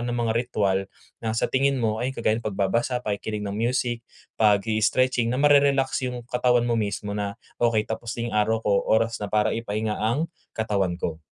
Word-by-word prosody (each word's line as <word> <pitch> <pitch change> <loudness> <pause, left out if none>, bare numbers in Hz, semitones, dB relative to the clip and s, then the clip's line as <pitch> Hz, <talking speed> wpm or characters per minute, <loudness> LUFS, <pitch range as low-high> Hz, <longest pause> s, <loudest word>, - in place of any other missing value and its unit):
ng 120 0 -2
mga 115 -2 +1
ritwal 105 -5 +1 0.4
na 110 - -1
sa - - +1
tingin 135 +1 +2
mo 110 -2 0
ay 130 - 0
kagaya 110 -1 +1
ng - - -19
pagbabasa 115 +6 0
pakikinig 105 0 -3
ng 100 - -3
music 120 +1 0 0.4
pag-i-stretching 110 +4 +3
na 125 - 0
ma-re-relax 140 -2 +4
yung 125 -1 -6
katawan 125 0 +2
mo 120 - +1
mismo 105 0 -3
na, 100 -1 -3 0.3
"Okey 110 -2 +3
tapos 115 +1 -4
na 115 0 -3
yung 105 - -1
araw 110 +2 +2
ko 105 - +2 0.2
oras 115 0 +2
na 105 - -2
para 105 0 +2
ipahinga 110 -1 -2
ang 120 +9 +1 0.3
katawan 100 -5 0
ko." 80 -2 -3
115 Hz, 185 wpm, -25 LUFS, 105-120 Hz, 0.4 s, ma-re-relax